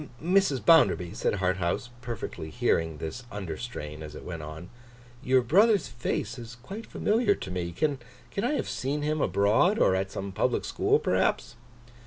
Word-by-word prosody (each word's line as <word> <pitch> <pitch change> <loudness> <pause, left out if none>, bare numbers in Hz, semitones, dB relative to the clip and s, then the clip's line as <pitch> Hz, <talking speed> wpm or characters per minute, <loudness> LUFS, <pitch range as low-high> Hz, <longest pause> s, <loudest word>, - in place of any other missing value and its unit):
'Mrs. 180 -5 +2
Bounderby,' 90 - +5
said - - 0
Harthouse, 95 +4 -1
perfectly 115 -9 -5
hearing 80 +2 0
this 80 +11 -6
under 100 -5 -4
strain 75 -11 -7
as 75 -1 -8
it - - -9
went 85 -3 -6
on; 80 +4 -8 0.5
'your 130 -2 +3
brother's 200 - +4
face 120 -1 -3
is 120 0 -9
quite 210 - -7
familiar 210 -1 +2
to 95 - -7
me. 90 -1 -3
Can 140 - 0 0.4
I 245 +7 +1
have - - -1
seen 145 +3 -2
him 155 0 0
abroad? 110 - +3
Or 95 - +4
at 95 0 0
some 100 0 -5
public 95 - 0
school, - - +2
perhaps? - - 0
115 Hz, 165 wpm, -28 LUFS, -, 0.5 s, Bounderby